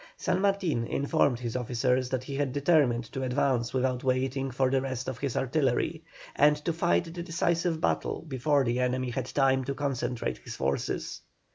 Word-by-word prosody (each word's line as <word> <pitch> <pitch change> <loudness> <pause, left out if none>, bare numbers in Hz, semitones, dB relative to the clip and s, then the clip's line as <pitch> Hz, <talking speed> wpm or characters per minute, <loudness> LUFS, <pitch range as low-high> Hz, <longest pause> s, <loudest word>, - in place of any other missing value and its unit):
San 185 - 0
Martin 185 -12 +1
informed 140 -3 +1
his 120 -1 -4
officers 125 +1 0
that 130 -1 -2
he 140 - -7
had 140 -1 0
determined 140 -5 +3
to 135 - -4
advance 125 -2 +1
without 130 -1 0
waiting 130 +1 0
for 130 0 +1
the 135 -1 +2
rest 130 -1 -4
of 130 -2 -4
his 140 -3 -2
artillery, 135 -1 0 0.3
and 150 +1 +5
to 170 - +1
fight 170 +1 +2
the 175 - -5
decisive 170 -1 0
battle - - -1
before 140 +1 +2
the 120 0 0
enemy 125 0 0
had 130 +1 -3
time 135 -1 +2
to 140 +2 -3
concentrate 125 -4 -2
his - - -8
forces. 70 +1 -2
130 Hz, 175 wpm, -28 LUFS, 125-145 Hz, 0.3 s, and